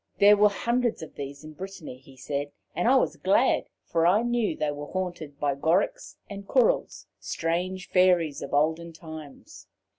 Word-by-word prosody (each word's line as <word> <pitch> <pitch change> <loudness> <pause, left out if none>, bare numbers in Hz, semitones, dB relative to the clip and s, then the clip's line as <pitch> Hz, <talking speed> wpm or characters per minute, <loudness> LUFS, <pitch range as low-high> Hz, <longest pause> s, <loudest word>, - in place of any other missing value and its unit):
There 205 +1 +7
were 210 0 +5
hundreds 235 -1 -1
of 160 - -10
these 140 +1 -7
in 155 0 -10
Brittany, 185 -7 -8
he 135 0 -18
said, 145 +2 -4 0.2
and - - 0
I - - +6
was - - +2
glad, - - +2 0.2
for 165 0 +2
I 205 +6 +4
knew 240 -3 0
they 150 -1 0
were 145 0 -7
haunted 175 -6 -5
by 145 -1 +1
"Gorics" 160 +8 0
and 200 -1 -8
"Courils" - - +1
strange 180 +2 -2
Fairies 180 -5 +3
of - - -6
olden 160 +3 +1
times. 160 -3 -11
170 Hz, 170 wpm, -27 LUFS, 145-195 Hz, 0.2 s, There